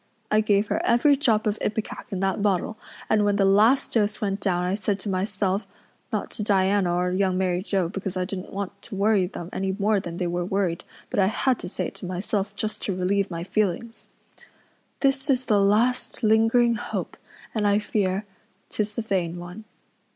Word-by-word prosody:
I 215 0 +5
gave 205 -1 +2
her - - 0
every 240 +5 +4
drop 235 -7 +2
of 210 0 0
ipecac 215 +3 -3
in 190 -1 -2
that 195 +1 0
bottle 205 +1 +1 0.3
and 210 -1 +3
when 205 0 +2
the 200 -1 +3
last 215 +7 +4
dose 210 -2 +1
went 200 -1 -1
down 180 -2 0
I 180 +1 0
said 200 0 -1
to 205 - -3
myself 195 +1 -1 0.4
not - - -2
to - - -6
Diana 195 -2 +2
or 180 +1 +1
Young 185 0 +1
Mary 180 -1 +1
Joe, 190 -3 0
because 190 0 -4
I 180 - 0
didn't 185 0 -6
want 200 0 -5
to 220 - -7
worry 200 -2 +3
them 175 -2 -8
any 190 0 -1
more 210 0 +2
than 170 -2 -6
they 180 - -1
were 175 0 -1
worried, 185 -2 -1 0.3
but - - 0
I 190 - +5
had 250 +4 +1
to - - -6
say - - -3
it - - -24
to 185 - -7
myself 195 +2 -2
just 215 +1 -3
to 195 - -1
relieve 195 +2 +1
my 170 -1 -4
feelings 215 +4 -2 0.9
'This 270 +1 +1
is 260 -1 +2
the 210 -3 +3
last 225 +6 +1
lingering 225 +2 +4
hope 220 - -4 0.4
and 210 -2 +1
I 205 0 +4
fear, 205 -1 -1 0.4
tis 210 -1 -3
a 230 - -1
vain 180 -5 -1
one. 180 +5 -9
200 Hz, 200 wpm, -25 LUFS, 185-215 Hz, 0.9 s, I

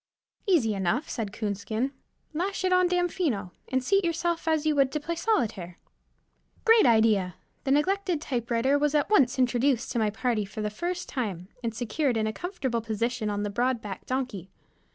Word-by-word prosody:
"Easy 280 - +3
enough," 200 - 0
said 220 -5 -3
Coonskin. 215 +4 -2 0.4
"Lash 375 +4 -2
it 370 - +3
on 365 0 +5
Damfino, 345 - 0 0.2
and 260 -1 0
seat 395 +8 +3
yourself 335 -1 -1
as 315 -1 +2
you 305 -1 +2
would 275 -2 +3
to 300 - 0
play 325 +3 -3
solitaire." 225 - -1 0.9
Great 455 - +6
idea! 215 -6 +3 0.3
The 270 - +1
neglected 365 +3 +2
typewriter 250 0 0
was 295 0 +1
at 295 +7 +1
once 275 - +4
introduced 250 0 +2
to 240 - 0
my 215 -1 +2
party 220 0 0
for 200 +2 -7
the 210 - -1
first 355 +10 -3
time, 195 - -4
and 230 -1 -2
secured 245 +2 0
in 220 - +1
a 220 - -1
comfortable 270 - -3
position 225 +1 -2
on 205 0 -1
the 205 - -2
broad 245 +3 +1
backed 200 -4 -8
donkey. 250 -8 -3
250 Hz, 175 wpm, -27 LUFS, 215-315 Hz, 0.9 s, Great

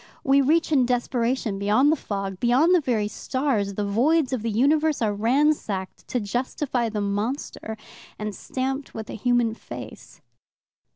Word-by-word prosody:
We 275 +1 +4
reach 320 +4 +2
in 260 -5 +4
desperation 240 -3 0
beyond 215 +9 +3
the - - +3
fog, 195 -7 -4
beyond 260 - +4
the 355 - +5
very 230 -6 0
stars, 220 -4 -1
the 210 - -1
voids 265 +8 +2
of 250 - -1
the 230 - -2
universe 295 +7 +2
are 215 -3 +1
ransacked 225 -4 0
to 250 - -1
justify 245 +3 -2
the 210 -1 -3
monster, 220 +2 -3 0.4
and 210 -1 -4
stamped 265 +5 -4
with 220 -1 -6
a - - -5
human 240 0 +1
face. - - -10
245 Hz, 155 wpm, -24 LUFS, 210-275 Hz, 0.4 s, the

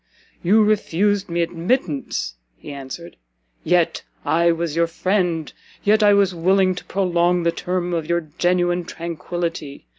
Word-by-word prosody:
"You 215 +5 +4
refused 205 -1 +1
me 170 0 +1
admittance," 165 - -1 0.2
he - - -10
answered, 140 +5 -8 0.5
"yet - - +2 0.2
I 170 +1 +3
was 165 -2 -2
your 170 0 +2
friend, 175 -2 -1 0.3
yet 215 +2 +4
I 205 -1 +6
was 200 -2 +3
willing 185 +2 +3
to 180 - -9
prolong 175 -2 +1
the 170 - +2
term 180 0 -2
of 165 -2 -2
your 170 0 +2 0.2
genuine 175 0 +2
[tranquillity]! 170 -3 -5
175 Hz, 140 wpm, -21 LUFS, 165-190 Hz, 0.5 s, I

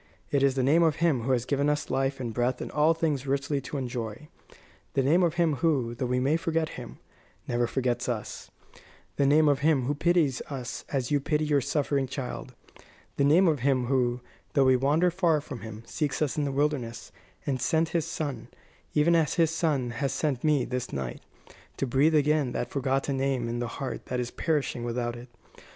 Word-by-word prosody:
It 140 - +2
is 135 -1 +3
the 130 - +1
name 150 +6 +4
of 160 -3 +3
Him 155 -7 +2
who 130 +4 -1
has 125 -2 +1
given 140 +2 +1
us 150 0 -1
life 135 +1 0
and 120 -3 -4
breath 125 +2 0
and - - -5
all 155 +2 +3
things 150 -5 -1
richly 140 +1 0
to 145 - -5
enjoy; 120 +1 -5 0.7
the 135 - +3
name 160 +7 +4
of 170 -2 +2
Him 165 -5 +2
who, 135 -8 +1
though 125 +2 -3
we 125 +1 +1
may 140 +5 +2
forget 165 -2 -1
Him, 125 -2 -9 0.5
never 120 0 +1
forgets 125 -1 -1
us; 115 -3 -5 0.7
the 140 - +3
name 155 +2 +5
of 145 -2 +3
Him 145 -2 +3
who 140 +4 0
pities 160 -3 +2
us 130 -4 -5
as 130 -2 -2
you 145 - +3
pity 150 +2 0
your 145 -2 +2
suffering 140 0 0
child; 125 -1 -6 0.6
the - - +2
name 165 +7 +5
of 155 -4 +2
Him 130 0 +1
who, 125 -1 +1 0.3
though 140 -2 +4
we 130 0 +5
wander 150 +7 +2
far 170 -3 +2
from 140 -4 -8
Him, 110 0 -8
seeks 150 -3 -2
us 150 -4 0
in 150 - 0
the 140 - -1
wilderness, 135 -5 -2 0.3
and 130 -4 -1
sent 160 0 +1
His 165 -3 0
Son, 145 -7 -4 0.5
even 165 +3 +4
as 160 -3 +2
His 165 -2 +3
Son 150 -7 0
has 135 +3 -2
sent 140 -6 -1
me 150 -5 +3
this 125 -1 -4
night, 65 -3 -4 0.6
to - - 0
breathe 140 +5 +3
again 150 -3 +2
that - - -3
forgotten 135 0 0
name 130 -3 0
in 120 +1 -3
the 120 - -2
heart 135 -2 -5
that 125 - -2
is 125 -1 -3
perishing 150 -7 -1
without 120 0 -2
it. 120 +1 -11
140 Hz, 205 wpm, -27 LUFS, 125-150 Hz, 0.7 s, name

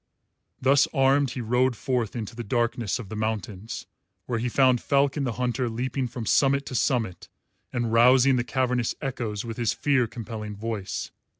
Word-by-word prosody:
Thus 135 +1 +4
armed 135 0 +4
he 125 +1 -5
rode 125 +2 +2
forth 120 -2 -2
into 115 -1 -5
the 120 - -5
darkness 120 -1 0
of 120 -6 -8
the 110 - -6
mountains, 110 -1 -4 0.4
where 120 -2 -2
he 125 +2 -1
found 130 -1 +3
Falcon 140 0 +1
the 120 - -1
Hunter 125 +1 -1
leaping 125 +3 -2
from 120 -1 -6
summit 140 +4 +3
to - - -7
summit 115 - -1 0.4
and 120 -3 -1
rousing 130 +3 +6
the 120 - +1
cavernous 125 -2 0
echoes 120 -6 -3
with 115 -1 -6
his 120 -2 +1
fear 135 -5 +2
compelling 110 -2 -6
voice. 105 -2 -4
120 Hz, 170 wpm, -26 LUFS, 110-130 Hz, 0.4 s, rousing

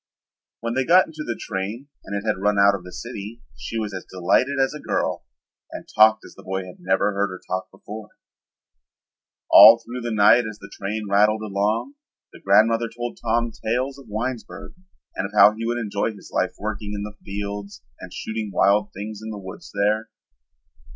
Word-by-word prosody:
When 115 0 -2
they 130 +2 +1
got 180 +7 +6
into 155 -1 -8
the 120 -5 -4
train 105 +6 -5 0.2
and 100 - -5
it 100 - -11
had 105 -4 -1
run 105 0 +2
out 100 0 +6
of 100 -3 -5
the 90 - -10
city 115 +1 -8
she 115 - -6
was 105 -2 -3
as 95 - -5
delighted 95 +10 +1
as 135 +1 +2
a 150 - -7
girl - - -2 0.5
and - - -8
talked 110 0 +5
as - - -13
the - - -14
boy 95 0 -3
had 90 - -12
never 95 +3 +1
heard 100 +1 +1
her 95 0 -8
talk 95 0 -3
before. 105 +2 -10 1.4
All 115 +2 +11
through 120 +2 -8
the 120 - -3
night 110 +2 +5
as 105 -1 -8
the - - -13
train 105 +2 -4
rattled 105 +2 +3
along, 105 - -1 0.4
the - - -14
grandmother 115 +4 +3
told 120 +1 -6
Tom 115 +1 0
tales 130 +5 -1
of 135 - -15
Winesburg 115 +3 -5 0.4
and 100 - -2
of 105 - -17
how 105 +1 +8
he 115 +1 -4
would 120 +1 -1
enjoy 105 -1 -1
his - - -14
life - - 0
working 105 0 -4
in 100 - -4
the 105 0 -7
fields 100 0 -6 0.2
and - - -10
shooting 110 -1 -4
wild 100 +2 +3
things 105 +2 -7
in 110 - -6
the 105 - -6
woods 95 -2 -10
there. 105 +2 0
105 Hz, 195 wpm, -23 LUFS, 100-115 Hz, 1.4 s, All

